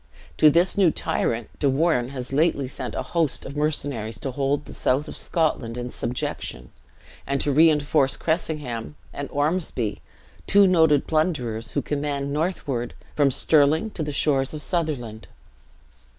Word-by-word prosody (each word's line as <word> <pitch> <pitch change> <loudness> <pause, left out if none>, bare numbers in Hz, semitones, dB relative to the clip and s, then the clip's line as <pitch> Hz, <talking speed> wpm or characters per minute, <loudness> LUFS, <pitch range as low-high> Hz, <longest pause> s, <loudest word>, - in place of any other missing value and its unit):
To 155 - +8
this 175 +6 +3
new 185 -4 +6
tyrant, 115 -6 -1
De 140 - +2
Warenne 135 -3 +1
has 130 -1 -6
lately 145 -2 +2
sent 130 - -5
a - - -2
host 165 -5 -1
of 140 - -7
mercenaries, 145 -7 -1
to 135 - -3
hold 140 +2 -1
the - - -10
south 140 +4 0
of - - -7
Scotland 130 -8 -1
in 125 0 -5
subjection; 65 - -4 0.6
and 140 0 0
to 145 - +1
reinforce 150 -2 +3
Cressingham 150 -7 -2 0.2
and 140 - -5
Ormsby, 145 - -1 0.5
two 200 0 +6
noted 160 -6 +4
plunderers, 125 -9 -1
who - - -1
command 140 -1 -2
northward, 145 -7 -2 0.2
from 145 -2 +4
Stirling 155 - +2
to 170 - -6
the 150 -1 -2
shores 135 0 +1
of 150 - -2
Sutherland. 135 - -2
145 Hz, 150 wpm, -24 LUFS, 125-155 Hz, 0.6 s, To